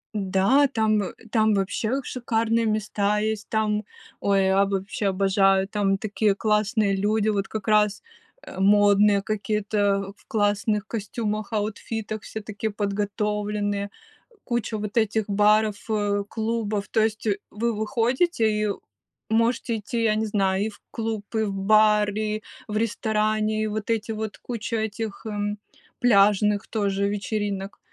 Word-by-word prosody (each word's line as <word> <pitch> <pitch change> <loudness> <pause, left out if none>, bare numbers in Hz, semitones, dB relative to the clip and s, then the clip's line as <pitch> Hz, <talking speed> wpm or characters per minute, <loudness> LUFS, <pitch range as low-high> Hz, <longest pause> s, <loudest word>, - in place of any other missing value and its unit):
Да, 200 +8 +3
там, 220 -5 +1
э, 185 - -5 0.2
там 220 -2 +3
вообще 215 +7 -1
шикарные 230 -2 0
места 210 -1 0
есть, 215 0 -2
там 215 -1 0 0.4
Ой, 195 -1 +2
я 190 +1 +4
б 200 - -4
вообще 200 +2 -3
обожаю, 195 0 +3
там 200 -1 +1
такие 210 0 0
классные 210 -1 +1
люди, 210 +2 +1
вот 200 -2 0
как 215 -1 -6
раз, 210 -1 +3 0.4
э, - - -9
модные 205 0 +5
какие-то, 205 -1 0
в - - -26
классных 210 -2 +1
костюмах, 215 -1 -3
аутфитах, 215 0 -3
все 220 - -7
такие 215 +1 -4
подготовленные, 205 0 -2 0.5
куча 235 -2 -2
вот 210 +1 -5
этих 220 -1 +2
баров, 210 +1 +3
э, 205 -2 0
клубов. 220 -2 -2
То 220 - +2
есть 220 0 -1 0.2
вы 230 +3 -1
выходите 230 +4 +1
и 210 0 0 0.6
можете 230 +1 +1
идти, 230 +2 -3
я 220 -1 +3
не 220 +1 0
знаю, 195 -1 +1
и - - -1
в 210 - -15
клуб, 220 -2 -3
и 220 - +2
в 200 -2 -2
бар, 210 +1 +4
и 215 0 -2 0.2
в 215 - -2
ресторане, 215 -1 0
и - - 0
вот 215 0 -4
эти 225 0 0
вот, 220 -1 -4
куча 230 -1 -4
этих, 220 0 -4
м, 205 -1 -2 0.4
пляжных 210 -2 +4
тоже 200 -2 0
вечеринок. 205 -1 -3
210 Hz, 140 wpm, -24 LUFS, 200-220 Hz, 0.6 s, модные